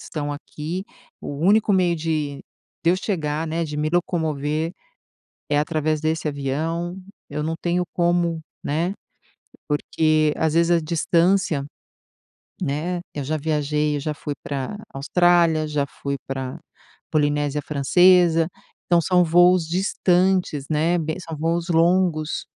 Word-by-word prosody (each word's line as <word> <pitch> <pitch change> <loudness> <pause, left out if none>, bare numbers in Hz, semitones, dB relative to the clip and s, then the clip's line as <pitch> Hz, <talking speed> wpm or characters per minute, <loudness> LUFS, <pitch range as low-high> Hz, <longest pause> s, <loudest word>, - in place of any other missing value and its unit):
estão 145 -2 -4
aqui. 155 +5 -6 0.4
O - - -7
único 205 +7 +3
meio 180 -3 +3
de 155 -3 -2 0.4
de 165 - +4
eu 180 - +3
chegar, 160 -5 -2
né, 165 +1 -2
de 150 -2 -5
me 150 +1 -1
locomover 160 -2 -1 0.8
é 145 - +3
através 155 0 0
desse 160 0 -1
avião, 160 +5 -2 0.3
eu 150 +1 -3
não 160 +2 -2
tenho 175 +1 0
como, 170 -1 +1 0.2
né, 170 +6 -1 0.7
porque 155 +1 +1
às 160 -1 0
vezes 170 +1 +3
a 170 -1 +4
distância, 170 -1 +1 1.0
né, 165 +6 -2
eu 145 - -3
já 150 +4 -1
viajei, 150 0 0
eu - - -3
já 150 +2 -3
fui 145 - -5
pra 140 +8 -4 0.2
Austrália, 165 +2 +3
já 150 -2 0
fui 140 +1 -4
pra 135 -1 -4 0.5
Polinésia 145 -1 +1
Francesa, 165 +3 +4 0.4
então, 175 - +4
são 180 +2 +3
voos 175 0 +4
distantes, 180 -3 +1
né, 160 +3 +2
be 160 -1 -2
são 165 -3 -7
voos 165 +3 -1
longos. 170 -2 +2
160 Hz, 135 wpm, -22 LUFS, 150-175 Hz, 1.0 s, de